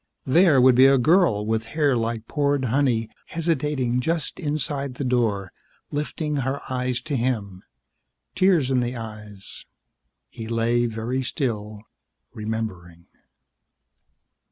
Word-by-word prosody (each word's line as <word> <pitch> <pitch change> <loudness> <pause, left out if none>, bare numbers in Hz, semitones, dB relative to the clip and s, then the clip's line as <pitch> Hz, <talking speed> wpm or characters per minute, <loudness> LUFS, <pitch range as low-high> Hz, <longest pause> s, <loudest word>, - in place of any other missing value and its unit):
There 155 +1 +5
would 130 0 +6
be 130 +2 +7
a 135 0 +5
girl 140 - +3
with 110 +1 -1
hair 145 -4 +3
like 115 -1 -2
poured 145 -2 0
honey 120 -2 +1 0.2
hesitating 150 -6 -1
just 160 +4 -2
inside 145 -4 -2
the 140 - -4
door, 115 -7 0 0.4
lifting 150 0 -2
her 135 +1 -1
eyes 125 -1 -1
to 150 - -3
him. 110 -7 -2 0.7
Tears 175 -8 +3
in 130 - +3
the 120 +1 -2
eyes. 105 -3 -9 0.6
He 110 - -8
lay 115 +1 +1
very 115 +3 -3
still, 110 -6 -3 0.5
remembering. 95 -6 -5
125 Hz, 120 wpm, -24 LUFS, 110-140 Hz, 0.7 s, be